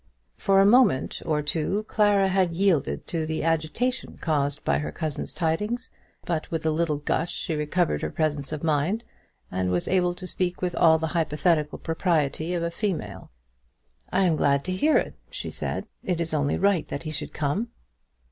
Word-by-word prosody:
For 195 0 +3
a 195 - +6
moment 210 - +4
or 150 -2 +1
two 165 +7 0
Clara 205 -2 +3
had 185 -2 +2
yielded 180 -4 +1
to 160 -2 -2
the 160 -1 -2
agitation 165 +11 -1
caused 145 -3 -1
by - - +2
her 150 - -3
cousin's 155 -4 -4
tidings; 210 +10 -1 0.3
but 165 -3 -2
with 160 -1 -3
a 160 - +3
little 155 -1 0
gush 150 +3 -1
she 165 - -3
recovered 155 +3 0
her - - -1
presence 150 -3 -1
of 155 -1 -4
mind, 165 +8 +1 0.5
and 90 0 -1
was 90 -1 0
able 180 -1 +2
to 185 - -8
speak 180 -1 -2
with 180 -1 -1
all 160 -1 +5
the 160 0 -2
hypothetical 155 -1 +1
propriety 165 0 0
of 170 - -1
a 170 - -1
female. 190 -2 -3 0.8
"I 195 - +3
am 170 -3 +3
glad 140 -1 +2
to 185 - -1
hear 300 +12 +3
it," - - -1 0.2
she - - -5
said. - - -3 0.2
"It 180 -3 -1
is 165 -1 -2
only 145 -2 +1
right 195 -4 +2
that 145 - -5
he 155 - -4
should 150 0 -3
come." 155 +11 -1
165 Hz, 185 wpm, -26 LUFS, 150-185 Hz, 0.8 s, a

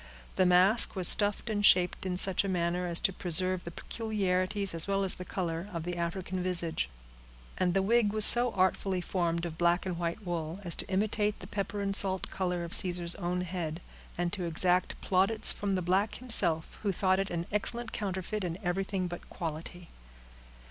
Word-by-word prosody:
The 185 -1 +3
mask 185 +7 +4
was 185 -3 +5
stuffed 205 +2 +3
and 210 -2 -2
shaped 180 -1 +4
in 180 -1 -2
such 190 0 +3
a - - -3
manner 180 0 -1
as 170 -1 +2
to 195 - +1
preserve 185 +1 -1
the - - -5
peculiarities, 195 -1 -2
as 165 +2 -1
well 195 0 0
as 190 - +1
the 180 - -8
color, 175 0 -4
of 170 -2 -5
the 175 +1 -4
African 180 +2 -4
visage; 170 - -2 0.7
and 180 -1 +1
the 195 - +2
wig 225 0 +2
was 215 0 +7
so 245 0 +7
artfully 185 0 0
formed 170 -2 -2
of 165 -1 -7
black 175 +1 +2
and 180 -2 -4
white 170 +5 -4
wool, 170 0 -4
as 175 -2 -2
to - - -1
imitate 210 +2 -1
the - - -9
pepper 200 +1 -4
and 195 0 -1
salt 190 -2 +2
color 180 -2 -2
of 170 - -5
Caesar's 175 -2 0
own 180 0 -3
head, 170 -3 -4 0.4
and 175 0 -2
to 185 -4 -2
exact 180 +2 0
plaudits 195 +4 +2
from 200 -1 -2
the 185 - -2
black 190 +4 0
himself, 170 -10 +2
who 205 - 0
thought 190 +1 +1
it 195 - -2
an 170 -1 -3
excellent 225 +3 +1
counterfeit 195 +1 -4
in 170 -1 -4
everything 185 +1 -2
but 175 0 -9
quality. 170 +1 -7
185 Hz, 190 wpm, -29 LUFS, 175-195 Hz, 0.7 s, was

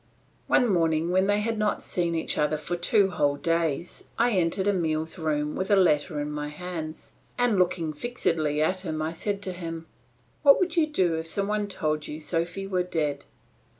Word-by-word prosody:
One 245 - +4
morning 165 -3 +2
when 190 +1 +3
they 205 0 +2
had 225 0 -1
not 210 -1 0
seen 170 -2 -1
each 160 - -1
other 150 +1 +1
for 155 +4 -3
two 190 +3 +3
whole 145 -4 +1
days, 165 +1 -1
I 240 +1 +3
entered 190 0 +1
Emile's 160 -3 0
room 150 -2 -1
with 190 - -2
a 205 - +6
letter 155 -4 +2
in 145 0 -3
my 150 0 -3
hands, 160 0 -7 0.3
and 245 -5 +2
looking 175 -3 +1
fixedly 155 -7 0
at 185 +3 0
him 160 -4 -4
I 155 +1 -2
said 200 +4 -3
to 185 - -3
him, 165 -2 -6 0.6
"What 280 -2 +7
would 370 -1 0
you 325 -3 +3
do 185 - +1
if 160 0 -4
some 195 +4 -1
one 210 0 0
told 155 -5 -2
you 150 - -6
Sophy 170 +4 -2
were 185 -2 0
dead?" 150 -5 -2
170 Hz, 190 wpm, -26 LUFS, 155-195 Hz, 0.6 s, What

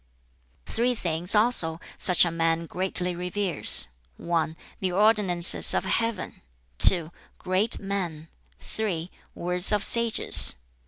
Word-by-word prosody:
"Three 245 +2 -4
things 175 -1 -5
also 210 -8 -1 0.2
such 180 -1 +2
a 170 - -5
man 165 0 -4
greatly 180 0 -1
reveres: 180 - -2 0.3
(1) 165 -1 -5 0.2
the 185 -1 -5
ordinances 195 -3 +2
of - - -4
Heaven, 230 -4 -6 0.4
(2) 170 -3 +6 0.3
great 190 +5 -1
men, 180 -6 -8 0.3
(3) 185 -6 -8 0.2
words 180 +1 +1
of 210 -1 -3
sages. 235 - +5
180 Hz, 110 wpm, -22 LUFS, 170-210 Hz, 0.4 s, 2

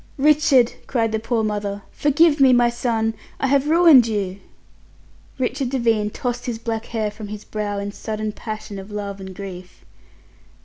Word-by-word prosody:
"Richard!" 290 -4 +4
cried 230 -3 0
the 220 - -1
poor 230 0 -1
mother. 205 -1 -3
"Forgive 295 +1 +3
me, 265 -2 +6
my 240 -1 +4
son! 225 -2 -1 0.3
I - - 0
have 280 +2 +2
ruined 320 -7 +7
you." 200 -3 -2 1.0
Richard 260 0 -1
Devine 230 -5 +1
tossed 245 +3 -4
his 235 -2 -2
black 225 0 -4
hair 220 -2 -2
from 210 0 -9
his 210 0 -7
brow 210 -1 -3
in 200 0 -4
sudden 215 0 -4
passion 215 -1 -7
of 190 +2 -10
love 200 -1 -5
and 190 -1 -9
grief. 185 -2 -9
225 Hz, 165 wpm, -21 LUFS, 210-255 Hz, 1.0 s, ruined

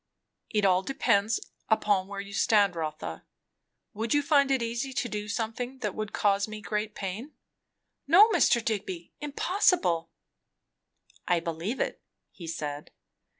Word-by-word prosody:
"It 210 -2 +1
all 185 -1 +4
depends 205 -2 +1 0.3
upon 205 -3 +2
where 200 0 -6
you 200 0 -7
stand, 200 -2 +3
Rotha. 155 - -5 0.7
Would 225 +5 -1
you 290 - +3
find 280 -2 +4
it 265 -3 +2
easy 235 +4 -3
to 255 -2 -1
do 210 -2 -4
something 230 +4 -3
that - - -2
would 215 -1 -4
cause 200 0 +2
me 215 0 -7
great 210 0 -3
pain?" 210 +9 -5 0.7
"No, 370 +9 +8
Mr. 235 - +3
Digby, 190 -6 -3
impossible." 295 - +1 1.2
"I 175 -2 +3
believe 170 +8 -4
it," - - -2 0.3
he 170 - -10
said. 150 -2 -5
210 Hz, 140 wpm, -28 LUFS, 185-245 Hz, 1.2 s, No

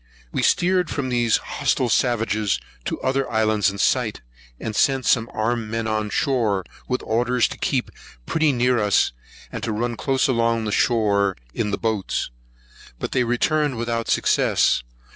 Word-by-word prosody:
We - - -1
steered 180 -1 +2
from 135 -2 -2
these 120 -2 +2
hostile 130 - -1
savages 110 -4 +1 0.3
to - - -3
other 135 0 0
islands 110 -2 +2
in 100 - -7
sight, - - +1 0.4
and 110 -1 -5
sent 135 +1 +2
some 115 -1 +2
armed 115 0 -1
men 115 0 -2
on 110 -1 -1
shore, 110 -6 0 0.2
with 125 - -2
orders 120 +2 +1
to - - -8
keep - - -1 0.3
pretty 160 -2 +2
near 125 -1 +2
us, 105 -2 +2 0.4
and - - -5
to 115 - -2
run 120 +2 -2
close 135 +2 +1
along 115 -3 +1
shore 100 -4 +2 0.2
in 110 -2 -1
the 100 - -1
boats. 110 - -2 0.7
But - - -4
they 125 - +2
returned 140 +3 +1
without 115 0 -2
success. - - +2
115 Hz, 155 wpm, -22 LUFS, 110-125 Hz, 0.7 s, steered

